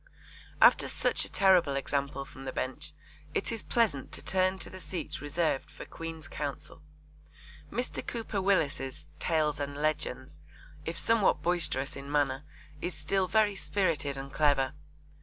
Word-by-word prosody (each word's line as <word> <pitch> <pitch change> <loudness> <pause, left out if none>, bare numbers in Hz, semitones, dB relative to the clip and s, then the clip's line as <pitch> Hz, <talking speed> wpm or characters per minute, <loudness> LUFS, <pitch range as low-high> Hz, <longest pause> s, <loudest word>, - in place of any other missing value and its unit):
After - - +7
such - - +1
a - - -10
terrible 185 -7 +5
example 140 0 -1
from 135 0 -11
the 130 - -2
Bench, 145 +5 -4 0.4
it - - 0
is 225 -2 -3
pleasant 210 - +1
to - - -6
turn 185 0 +2
to 180 - -4
the 185 - -8
seats 180 -3 -5
reserved 145 -1 0
for - - -9
Queen's 165 -2 -7
Counsel. 145 +1 -5 0.9
Mr. 245 +1 -3
Cooper 225 -4 -2
Willis's 145 -9 0
Tales 155 -3 +1
and 145 0 -3
Legends, 155 +1 -2 0.5
if - - -3
somewhat 230 -3 +3
boisterous 165 -6 +1
in 140 +1 -7
manner, 140 -2 +1 0.4
is 175 -1 -2
still 190 +1 +1
very 215 0 +3
spirited 165 -8 0
and 135 0 -7
clever. 145 -3 +3
155 Hz, 145 wpm, -30 LUFS, 140-185 Hz, 0.9 s, After